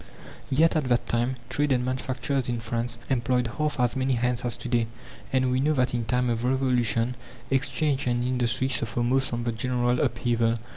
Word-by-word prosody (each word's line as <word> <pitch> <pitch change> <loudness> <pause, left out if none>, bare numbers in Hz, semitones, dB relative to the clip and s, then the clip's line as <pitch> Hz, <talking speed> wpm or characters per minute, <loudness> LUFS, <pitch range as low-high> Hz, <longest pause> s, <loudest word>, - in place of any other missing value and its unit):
Yet 160 +5 +3
at 155 -3 +1
that 120 -1 +1
time 120 +2 0
trade 145 +2 0
and 125 -1 +2
manufacturers 130 0 -2
in 120 -1 -1
France 115 +1 -3
employed 125 -1 +1
half 150 -3 0
as 125 0 +2
many 130 0 +1
hands 125 0 0
as 120 -1 +1
to 120 - -7
day. 120 -2 +1 0.4
And 130 -1 +2
we 130 - +1
know 150 +3 +2
that 130 -3 +1
in 120 -2 -1
time 125 +3 +1
of 115 0 -2
Revolution 125 -2 +1 0.4
exchange 135 +1 +1
and 120 0 +1
industry 125 0 +1
suffer 120 -2 -1
most 130 +2 +2
from 120 0 -3
the 120 - 0
general 120 +1 0
upheaval. 115 -1 +1
125 Hz, 190 wpm, -26 LUFS, 120-130 Hz, 0.4 s, Yet